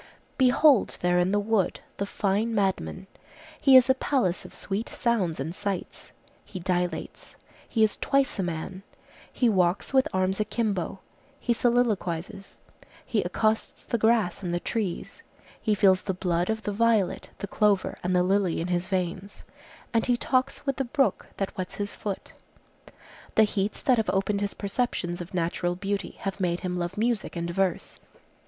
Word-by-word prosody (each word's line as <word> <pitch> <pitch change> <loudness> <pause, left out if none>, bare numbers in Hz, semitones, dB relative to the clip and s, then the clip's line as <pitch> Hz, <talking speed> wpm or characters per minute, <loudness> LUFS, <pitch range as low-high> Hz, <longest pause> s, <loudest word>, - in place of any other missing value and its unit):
Behold 260 0 +4
there 180 0 +3
in 180 +2 +2
the 205 - +2
wood 205 -2 0 0.2
the 200 - -2
fine 210 +3 0
madman! 195 -2 -1 0.6
He 270 -2 +8
is 255 - +6
a 260 - +5
palace 260 -9 0
of - - -10
sweet 205 +3 -4
sounds 200 - 0
and 155 +5 -3
sights; 200 -1 -5 0.3
he 185 - -8
dilates; 180 0 -3 0.3
he 225 -3 +2
is 215 - +2
twice 275 -5 +1
a - - +3
man; 175 +2 -4 0.5
he 245 - +2
walks 185 +1 +1
with 265 -1 +4
arms 185 +1 0
akimbo; 210 -4 -1 0.4
he 240 - +1
soliloquizes; 210 -6 0 0.5
he - - +1
accosts 220 0 -1
the 235 - -2
grass 220 -5 +2
and 175 -2 -2
the - - 0
trees; 195 0 -3 0.4
he 215 -2 +2
feels 190 -2 +4
the 190 - -3
blood 175 0 0
of 220 0 -1
the 205 - -2
violet, 220 -3 +1
the - - -4
clover 205 -1 +1
and 180 +1 0
the 180 - +4
lily 190 -1 +1
in 170 +2 -3
his 175 0 0
veins; 185 +1 -3 0.5
and 230 +1 +2
he 245 -1 +3
talks 260 +3 0
with 275 -2 -1
the 270 - +1
brook 270 +2 +1
that 195 - -3
wets 185 -1 -5
his 205 0 -3
foot. 200 -2 -5 1.0
The 220 - +7
heats 205 -1 -1
that 255 -2 +4
have 220 - 0
opened 200 +1 0
his 200 -1 -2
perceptions 195 -5 -2
of 175 +1 -8
natural 175 +1 0
beauty 195 0 -3
have 195 0 -3
made 175 -2 0
him 180 -1 -2
love 175 +2 -3
music 230 -3 0
and 170 0 -2
verse. 185 -1 -1
200 Hz, 170 wpm, -27 LUFS, 180-225 Hz, 1.0 s, He